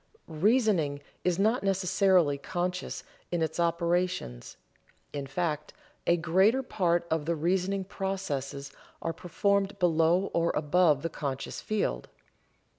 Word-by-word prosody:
Reasoning 170 Hz, -, +2 dB, 0.2 s
is 180 Hz, -2 st, +1 dB
not 220 Hz, +5 st, +2 dB
necessarily 185 Hz, -5 st, +2 dB
conscious 180 Hz, +4 st, -3 dB, 0.3 s
in 175 Hz, -2 st, +1 dB
its 160 Hz, -, -3 dB
operations, 170 Hz, -, -1 dB, 0.6 s
in 140 Hz, -2 st, -4 dB
fact, 150 Hz, +2 st, -2 dB, 0.3 s
a 170 Hz, -, +4 dB
greater 190 Hz, +10 st, +3 dB
part 175 Hz, -8 st, +1 dB
of 160 Hz, -2 st, 0 dB
the 170 Hz, -, +1 dB
reasoning 185 Hz, +4 st, 0 dB
processes 165 Hz, -9 st, -4 dB, 0.3 s
are 165 Hz, -, -1 dB
performed 200 Hz, +3 st, 0 dB
below 175 Hz, +1 st, +2 dB
or 170 Hz, 0 st, +2 dB
above 150 Hz, -1 st, +3 dB
the 165 Hz, -, -1 dB
conscious 135 Hz, -4 st, -4 dB
field. 200 Hz, -, -2 dB
175 Hz, 115 wpm, -29 LUFS, 155-190 Hz, 0.6 s, a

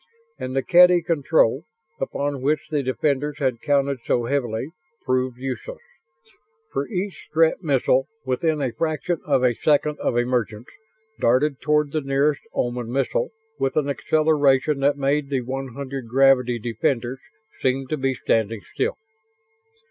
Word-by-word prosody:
And 130 Hz, 0 st, -4 dB
the 135 Hz, -, +1 dB
Kedy 180 Hz, -1 st, +6 dB
control, 145 Hz, -4 st, +2 dB, 0.4 s
upon 140 Hz, 0 st, -2 dB
which 150 Hz, +2 st, 0 dB
the 150 Hz, -2 st, +1 dB
defenders 140 Hz, +2 st, -1 dB
had 130 Hz, -5 st, -1 dB
counted 140 Hz, -2 st, +1 dB
so 120 Hz, -, +1 dB
heavily, 125 Hz, 0 st, -2 dB, 0.3 s
proved 130 Hz, -1 st, 0 dB
useless. 135 Hz, -, -5 dB, 1.0 s
For -, -, -1 dB
each 195 Hz, -3 st, -4 dB
Strett 160 Hz, +2 st, +2 dB
missile, 135 Hz, -4 st, +2 dB, 0.2 s
within 145 Hz, +3 st, 0 dB
a 130 Hz, -, -1 dB
fraction 160 Hz, +4 st, -2 dB
of 135 Hz, -3 st, +2 dB
a 125 Hz, -1 st, +4 dB
second 150 Hz, +3 st, +1 dB
of 120 Hz, -, 0 dB
emergence, 120 Hz, -2 st, -1 dB, 0.5 s
darted 135 Hz, +4 st, +2 dB
toward 150 Hz, -1 st, +1 dB
the 155 Hz, -, -1 dB
nearest 140 Hz, +1 st, +1 dB
Oman 120 Hz, -1 st, -2 dB
missile 135 Hz, 0 st, 0 dB, 0.3 s
with 135 Hz, 0 st, 0 dB
an 145 Hz, -2 st, +1 dB
acceleration 145 Hz, -2 st, +2 dB
that 140 Hz, +1 st, +2 dB
made 140 Hz, +1 st, 0 dB
the 135 Hz, -2 st, 0 dB
one 130 Hz, 0 st, -5 dB
hundred 135 Hz, -3 st, -5 dB
gravity 125 Hz, -1 st, +4 dB
defenders 120 Hz, +2 st, -2 dB, 0.4 s
seem 135 Hz, +1 st, +1 dB
to 155 Hz, -, -1 dB
be 135 Hz, -1 st, 0 dB
standing 110 Hz, -2 st, 0 dB
still. 480 Hz, +4 st, -1 dB
135 Hz, 140 wpm, -23 LUFS, 125-150 Hz, 1.0 s, Kedy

